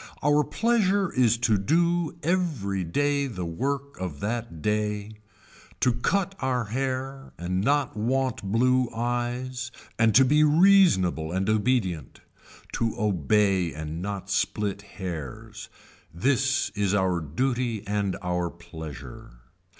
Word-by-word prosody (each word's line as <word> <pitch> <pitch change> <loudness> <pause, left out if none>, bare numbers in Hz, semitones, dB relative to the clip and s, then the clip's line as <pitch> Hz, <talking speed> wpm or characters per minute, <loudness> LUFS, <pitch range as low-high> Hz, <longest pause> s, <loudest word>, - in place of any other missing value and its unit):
Our 145 +1 +4
pleasure 205 - +1
is 120 -3 +3
to 115 -3 +2
do 170 - +1
every 145 - 0
day 140 +10 0
the 90 -8 -5
work 140 +11 -3
of 90 -6 -5
that 115 -5 -3
day, 105 +2 -2 0.6
to 125 -1 +3
cut 195 +11 0
our 130 -2 0
hair 135 +3 -3
and 90 +2 -2
not 145 +2 +1
want 125 +2 0
blue 125 +5 +2
eyes 120 +2 -2 0.3
and 110 -2 +4
to 135 - +7
be 150 +4 +4
reasonable 150 - +4
and 95 +2 -1
obedient. 105 - 0 0.6
To 115 -1 0
obey 95 -2 +1
and 80 +2 -5
not 100 -1 -4
split 100 +1 -1
hairs. 90 -9 -7 0.4
This 130 +7 +1
is 100 -2 0
our 95 -3 +1
duty 115 - -2
and 100 -1 -1
our 90 -1 -1
pleasure. 80 -7 -10
115 Hz, 120 wpm, -26 LUFS, 95-135 Hz, 0.6 s, to